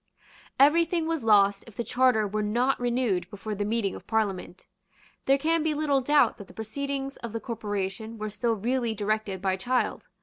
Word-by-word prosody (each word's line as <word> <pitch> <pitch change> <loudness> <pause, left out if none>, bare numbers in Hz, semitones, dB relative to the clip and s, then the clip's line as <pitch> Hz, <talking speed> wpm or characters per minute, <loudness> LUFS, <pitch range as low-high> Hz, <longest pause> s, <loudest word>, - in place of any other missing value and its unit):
Every 300 +5 +6
thing 335 0 -1
was 325 -4 -2
lost 200 -2 +4
if 225 - -13
the 235 - -2
Charter 250 -4 +2
were 210 +2 -2
not 240 +6 +1
renewed 240 -7 0
before 210 +2 -6
the 205 0 -2
meeting 210 -2 0
of - - -11
Parliament. 200 -4 -2 0.6
There 270 +1 +5
can 325 +3 +1
be 310 -1 0
little 290 -2 +1
doubt 280 -3 +3
that 200 - -9
the 180 - -16
proceedings 275 +5 -4
of 235 -2 -7
the 225 - -2
corporation 215 -1 -4
were 215 0 -4
still 230 +3 0
really 235 +1 -1
directed 205 -2 -2
by 190 -1 +1
Child. 245 +6 -1
225 Hz, 190 wpm, -27 LUFS, 205-270 Hz, 0.6 s, Every